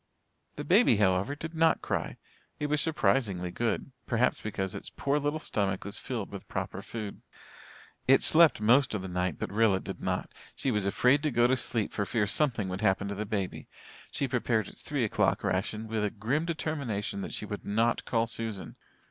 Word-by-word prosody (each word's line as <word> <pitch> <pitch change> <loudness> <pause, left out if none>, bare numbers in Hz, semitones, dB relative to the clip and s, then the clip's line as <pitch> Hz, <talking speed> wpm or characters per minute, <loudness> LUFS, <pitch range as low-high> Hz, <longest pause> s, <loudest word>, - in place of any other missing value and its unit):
The 145 - -5
baby, 180 - +5
however, 100 +6 +2
did 160 +2 -7
not 160 0 +3
cry. - - -2 0.4
It 150 - -1
was 150 0 +3
surprisingly 105 - +1
good 120 +6 -2 0.2
perhaps 120 +1 +1
because 95 -3 -3
its - - -7
poor 140 +1 0
little 145 +1 -1
stomach 100 - -1
was 100 - -4
filled 115 -6 -4
with 100 -2 -8
proper - - -4
food. 110 -3 -6 0.9
It 135 +1 +6
slept 165 -5 +6
most 120 +3 +4
of 95 - -3
the - - -4
night 90 -3 -1
but - - -4
Rilla 105 -3 +3
did - - -7
not. - - -2 0.2
She 135 - -1
was 105 -3 0
afraid 125 +8 +3
to 155 - +1
go 120 -2 +3
to 130 +2 +4
sleep 115 -3 -2
for 105 -2 -1
fear 110 0 +1
something 115 -2 +1
would 95 +1 -4
happen 100 -1 +2
to 100 - -3
the 105 +1 -4
baby. 100 -3 -3 0.4
She 140 - -2
prepared 115 -4 0
its - - -10
three - - -1
o'clock - - +1
ration 105 +4 -1
with 110 -1 -1
a 105 - +1
grim 120 +11 -1
determination 140 -12 -2
that - - -5
she - - -4
would 105 0 -6
not 115 +3 +1
call 115 -1 +1
Susan. 115 -3 -5
110 Hz, 195 wpm, -29 LUFS, 100-135 Hz, 0.9 s, It